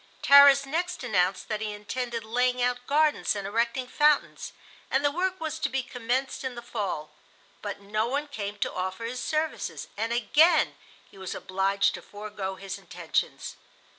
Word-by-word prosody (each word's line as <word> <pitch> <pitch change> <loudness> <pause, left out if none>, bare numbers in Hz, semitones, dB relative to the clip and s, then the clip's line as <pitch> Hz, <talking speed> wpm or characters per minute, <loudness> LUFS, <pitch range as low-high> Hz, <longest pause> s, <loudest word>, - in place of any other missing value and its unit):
Tarras 280 0 +8
next 345 +3 -2
announced 190 -5 +1
that 215 -1 -3
he 215 -1 -2
intended 230 +3 -4
laying 250 +3 +1
out 245 0 0
gardens 300 -4 +2
and 200 -1 -4
erecting 235 +5 0
fountains, 295 +3 +2 0.4
and 270 +2 +1
the 290 - +3
work 370 +4 -1
was 320 0 -4
to 285 - 0
be 265 -1 -1
commenced 250 +3 -2
in 260 -2 -4
the 240 - -8
fall, 195 -10 -4 0.5
but 200 -1 -5
no 215 +3 -1
one 285 +4 -2
came 205 -7 -5
to - - -2
offer 190 +4 -3
his 250 +2 -4
services, 315 0 -2
and 225 +2 -2
again 300 +8 +4 0.4
he 195 - -15
was 190 - -5
obliged 195 +1 +1
to - - -7
forego 205 -2 -6
his 195 0 -6
intentions. - - -3
240 Hz, 165 wpm, -27 LUFS, 205-280 Hz, 0.5 s, Tarras